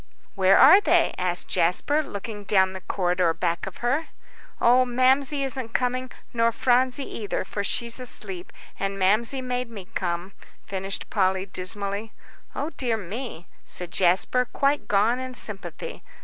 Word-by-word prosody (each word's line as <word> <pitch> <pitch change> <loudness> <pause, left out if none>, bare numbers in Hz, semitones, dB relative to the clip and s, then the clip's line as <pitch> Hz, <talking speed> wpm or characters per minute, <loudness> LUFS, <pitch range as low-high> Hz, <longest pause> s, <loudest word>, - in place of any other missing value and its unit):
"Where 190 0 +5
are 370 +10 +8
they?" 345 -3 +3
asked 180 -1 -1
Jasper, 235 - +2
looking 210 -5 -7
down 190 -2 +3
the 190 - -7
corridor 180 -3 0
back 170 +4 -1
of 190 - -8
her. 280 +7 +1 0.5
"Oh, 250 +2 +5
Mamsie 260 +3 +2
isn't 260 -4 -5
coming, 255 0 0 0.2
nor 230 0 +3
Phronsie 255 +3 +2
either, 205 -3 -3
for 200 +1 -4
she's 235 +4 -1
asleep. 195 -7 -2 0.3
And 195 0 -2
Mamsie 220 +7 +2
made 250 -1 -2
me 200 -5 -10
come," 175 +1 -2 0.3
finished 195 0 -5
Polly, 190 -1 +1
dismally. 200 +3 -3 0.4
"O 300 +3 -3
dear 245 -6 -1
me," 210 -2 -6 0.2
said 175 -1 -6
Jasper, 190 +7 +3
quite 280 +1 +1
gone 215 +5 +2
in 255 -1 -6
sympathy. 215 - -5
220 Hz, 145 wpm, -25 LUFS, 190-255 Hz, 0.5 s, are